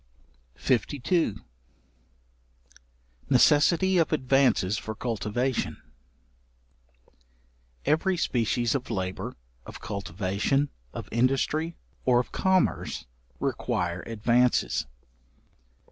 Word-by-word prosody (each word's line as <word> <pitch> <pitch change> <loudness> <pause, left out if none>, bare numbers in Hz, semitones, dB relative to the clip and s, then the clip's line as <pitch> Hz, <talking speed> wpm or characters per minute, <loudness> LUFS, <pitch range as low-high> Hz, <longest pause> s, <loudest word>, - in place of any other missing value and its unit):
§52. 140 - 0 1.9
Necessity 160 +8 +4
of 165 - +2
advances 130 - +2
for 110 - -6
cultivation. 120 +2 -2 2.1
Every 180 +4 +2
species 120 -3 +1
of 130 -2 -3
labour, 95 -4 -3 0.3
of - - -10
cultivation, 100 - -1 0.2
of - - -7
industry, 135 +7 +1 0.3
or 125 -1 +4
of 125 - -3
commerce, 190 - +1 0.3
require 90 0 -1
advances. 120 +3 +2
125 Hz, 70 wpm, -27 LUFS, 110-145 Hz, 2.1 s, Necessity